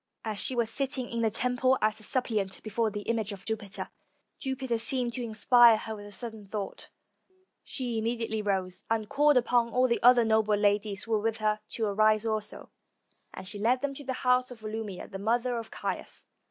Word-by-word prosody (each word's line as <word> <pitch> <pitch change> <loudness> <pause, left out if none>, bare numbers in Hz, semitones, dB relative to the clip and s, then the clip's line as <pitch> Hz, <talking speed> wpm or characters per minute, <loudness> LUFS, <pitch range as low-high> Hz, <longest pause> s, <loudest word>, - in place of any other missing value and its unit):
As 215 -2 -3
she 255 - -1
was 235 -2 +1
sitting 270 -2 -1
in 235 0 -2
the 225 - +3
temple 250 +3 +2
as 215 0 +1
a - - -7
suppliant 215 -5 0
before 220 +1 0
the 205 0 -5
image 220 -2 -1
of 195 -1 -9
Jupiter, 215 -3 -3 0.5
Jupiter 265 -3 -2
seemed 240 +1 +1
to 255 - -3
inspire 235 0 +5
her 220 0 -6
with 205 -1 -10
a - - -12
sudden 220 -1 -7
thought, 200 0 -6 0.4
and 375 - -35 0.3
she 245 -4 -2
immediately 225 -1 -2
rose, 190 -3 -2
and 220 -1 0
called 295 +2 +4
upon 240 -1 +2
all 250 +2 +3
the 235 - 0
other 245 -1 +6
noble 220 -1 +3
ladies 205 -1 +1
who 230 - -9
were 215 - +3
with 225 0 -1
her 215 -1 0
to 225 - -1
arise 215 +1 +3
also, 215 -1 -4 0.6
and 185 - -9
she 205 +1 -7
led 245 +5 +2
them 285 -1 -1
to 285 - -9
the 265 -1 -3
house 250 0 +3
of 245 -3 -10
Volumnia, 215 -3 -5
the 195 - -8
mother 235 +3 0
of 225 -1 -8
Caius. - - -5
225 Hz, 205 wpm, -29 LUFS, 210-245 Hz, 0.6 s, other